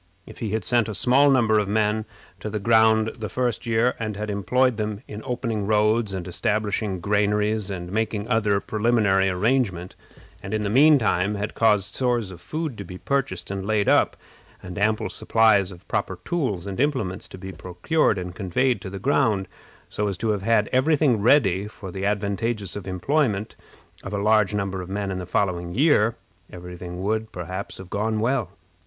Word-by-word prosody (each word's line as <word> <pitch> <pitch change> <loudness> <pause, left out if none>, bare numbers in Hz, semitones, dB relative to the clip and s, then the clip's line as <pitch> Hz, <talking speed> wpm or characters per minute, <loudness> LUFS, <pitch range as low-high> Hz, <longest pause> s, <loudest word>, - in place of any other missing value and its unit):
If - - -13
he 110 - -3
had 110 - -1
sent 120 -2 +2
a 110 - -4
small 135 +6 +4
number 115 -5 +4
of 105 - -1
men 105 +1 +1 0.3
to 110 - -5
the 105 - -3
ground 110 0 +4
the 110 -2 -4
first 125 -2 -2
year, 115 +2 +2
and 110 -2 -3
had 105 0 -3
employed 125 +5 +1
them 105 +1 -3
in 105 +1 -7
opening 115 -5 -3
roads, 105 -1 +2
establishing 100 +2 -1
granaries, 105 +2 0
and 90 -2 -5
making 110 0 -1
other 105 -4 +2
preliminary 105 -3 +2
arrangements, 95 -2 0 0.5
and, 100 +1 -4
in 105 - -1
the 100 - -1
mean 145 +5 +6
time, 105 -4 +1
had 105 +1 -4
caused 105 -4 +2
stores 120 -6 0
of 85 -2 -12
food 155 - -4
to - - -4
be 90 0 -9
purchased 125 -8 -2
and 100 -1 -4
laid 105 0 0
up, - - +3 0.5
and 90 +2 -7
ample 110 +1 +1
supplies 110 -4 +3
of 90 -1 -14
proper 95 - -2
tools 125 - -1
and 100 +1 -5
implements 130 -10 -1
to - - -11
be 95 +1 -7
procured 90 - 0
and 90 -1 -5
conveyed 105 +5 0
to 95 - -6
the 100 - -6
ground, 105 -5 +1 0.4
so 105 - -2
as 100 -3 -3
to 110 +3 -2
have 105 -2 0
had 110 0 +2
every 140 +5 +3
thing 135 -8 +2
ready 100 -6 +3
for 100 -3 -9
the 95 +2 -2
advantageous 105 0 -2
employment 105 - -1 0.5
of 100 - -7
a 100 - -2
large 105 -2 +3
number 100 -2 -2
of 90 - -8
men 100 0 -3
in 95 - -3
the 90 - -6
following 90 -2 -1
year, 120 -5 +3 0.4
every 90 0 -9
thing 90 +1 -7
would, 110 +2 -1
perhaps, 90 +3 -6
have 95 -1 -11
gone 110 +1 -1
well. 120 -3 0
105 Hz, 185 wpm, -24 LUFS, 95-115 Hz, 0.5 s, mean